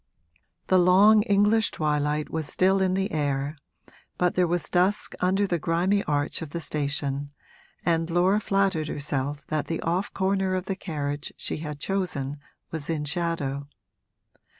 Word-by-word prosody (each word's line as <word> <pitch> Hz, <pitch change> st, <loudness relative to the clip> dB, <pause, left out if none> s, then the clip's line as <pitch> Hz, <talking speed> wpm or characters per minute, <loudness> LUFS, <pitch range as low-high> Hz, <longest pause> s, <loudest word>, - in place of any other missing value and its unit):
The 185 Hz, -, +4 dB
long 195 Hz, +4 st, +6 dB
English 210 Hz, +1 st, +3 dB
twilight 150 Hz, 0 st, -1 dB
was 160 Hz, -2 st, -3 dB
still 190 Hz, +4 st, +2 dB
in 185 Hz, -1 st, +2 dB
the 195 Hz, +1 st, -1 dB
air, 145 Hz, -1 st, -1 dB, 0.6 s
but 180 Hz, 0 st, +2 dB
there 180 Hz, -1 st, +2 dB
was 175 Hz, -1 st, 0 dB
dusk 185 Hz, +3 st, +1 dB
under 190 Hz, +3 st, +2 dB
the 175 Hz, -3 st, -1 dB
grimy 180 Hz, +6 st, +1 dB
arch 145 Hz, +1 st, 0 dB
of 160 Hz, -, -5 dB
the 170 Hz, -, -4 dB
station 145 Hz, -2 st, -2 dB, 0.6 s
and 165 Hz, -1 st, +1 dB
Laura 180 Hz, +4 st, +3 dB
flattered 195 Hz, -6 st, +1 dB
herself 145 Hz, 0 st, -3 dB
that 155 Hz, -1 st, -1 dB
the 165 Hz, -, -2 dB
off 175 Hz, +4 st, -1 dB
corner 190 Hz, -1 st, 0 dB
of 185 Hz, 0 st, -2 dB
the 195 Hz, -, -2 dB
carriage 145 Hz, -5 st, -4 dB
she -, -, -3 dB
had 150 Hz, -2 st, -6 dB
chosen 150 Hz, -7 st, -2 dB, 0.3 s
was 160 Hz, -2 st, -4 dB
in 155 Hz, -2 st, -1 dB
shadow. 145 Hz, -4 st, -2 dB
165 Hz, 150 wpm, -26 LUFS, 150-190 Hz, 0.6 s, long